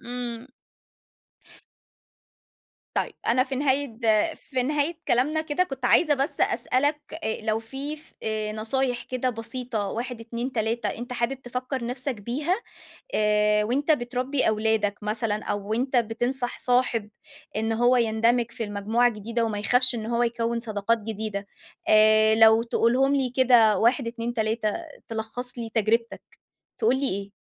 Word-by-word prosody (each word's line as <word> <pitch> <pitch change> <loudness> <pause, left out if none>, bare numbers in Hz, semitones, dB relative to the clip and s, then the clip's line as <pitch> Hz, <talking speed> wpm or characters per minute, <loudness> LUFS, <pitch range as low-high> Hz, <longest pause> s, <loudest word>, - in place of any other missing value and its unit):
إمم. 240 0 -5 2.5
طيب، - - -1
أنا 250 +2 +4
في 265 0 -4
نهاية 265 -4 -1 0.3
في 255 -2 -3
نهاية 295 +4 0
كلامنا 290 +6 +2
كده 315 +3 0
كنت 270 -8 -5
عايزة 305 +4 +4
بس 275 0 -2
أسألك 290 +4 +1 0.2
آآ، 220 - -2
لو 220 0 0
في 270 +6 -6
ف 310 0 -17 0.4
نصايح 240 +3 -1
كده 255 0 -2
بسيطة 225 -2 -4
1، 240 +3 -4
2، 235 +3 -4
3، 230 0 -1
انت 245 +2 -4
حابب 250 +2 -2
تفكّر 250 +1 -4
نَفْسك 255 +2 -2
بيها 285 - -1 0.6
آآ 210 0 +3
وأنت 275 +8 +1
بتربّي 255 0 0
أولادك 215 -1 +1
مثلًا 210 0 -1
أو 205 0 -4
وأنت 255 +5 -1
بتنصح 240 +2 -1
صاحب، 245 -4 +1 0.5
إن 220 +1 -1
هو 240 +3 +3
يندمج 230 +1 +2
في 235 - -4
المجموعة 215 +3 +1
الجديدة، 230 +1 -2
وما 210 -2 -2
يخافش 250 +4 +5
إن 220 -2 -4
هو 235 +1 +1
يكوّن 235 0 -1
صداقات 225 0 0
جديدة 210 -2 -4 0.4
آآ 215 0 +6
لو 225 0 +6
تقولهم 250 +4 +2
لي 265 -2 +1
كده 240 -4 +5
1، 235 +2 +2
2، 230 0 -4
3، 220 0 -1 0.5
تلخّص 230 +3 -4
لي 230 -1 -5
تجربتك، 230 +1 0 0.6
تقول 440 - +2
لي 275 0 0
إيه؟ 200 +1 -4
235 Hz, 140 wpm, -25 LUFS, 220-255 Hz, 2.5 s, آآ